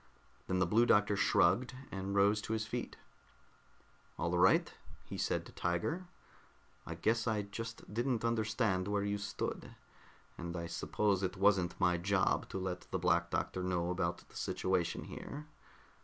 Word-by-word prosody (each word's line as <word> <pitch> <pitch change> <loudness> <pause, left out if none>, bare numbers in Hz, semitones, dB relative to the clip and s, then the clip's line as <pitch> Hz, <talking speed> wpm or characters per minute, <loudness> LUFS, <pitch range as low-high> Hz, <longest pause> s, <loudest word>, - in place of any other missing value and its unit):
Then 95 - 0
the 90 - +3
Blue 115 +7 +4
Doctor 105 -2 +4
shrugged 125 +5 +3 0.2
and 95 +1 -3
rose 100 +1 +4
to 110 - -3
his 110 -1 -1
feet. 120 +2 -4 1.2
"All 85 +1 0
right," 90 +2 +4 0.3
he - - -7
said - - -1
to - - -11
Tiger. 90 - -1 0.8
"I - - -4
guess 115 +2 +1
I 110 -2 +1
just 115 +1 -7
didn't 120 0 0
understand 110 -4 +1
where 100 0 0
you 100 0 -1
stood, 100 0 -4 0.6
and 85 0 -4
I 85 - -3
suppose 95 +4 0
it 95 0 -2
wasn't 95 -3 +3
my 90 -1 +3
job 95 +1 +1
to - - -4
let 90 -1 -4
the 95 - -1
Black 85 -1 +2
Doctor 95 - -1
know 90 -1 0
about 90 -1 -2
the - - -20
situation 90 -2 0
here. 150 +2 -7
100 Hz, 155 wpm, -34 LUFS, 90-110 Hz, 1.2 s, Blue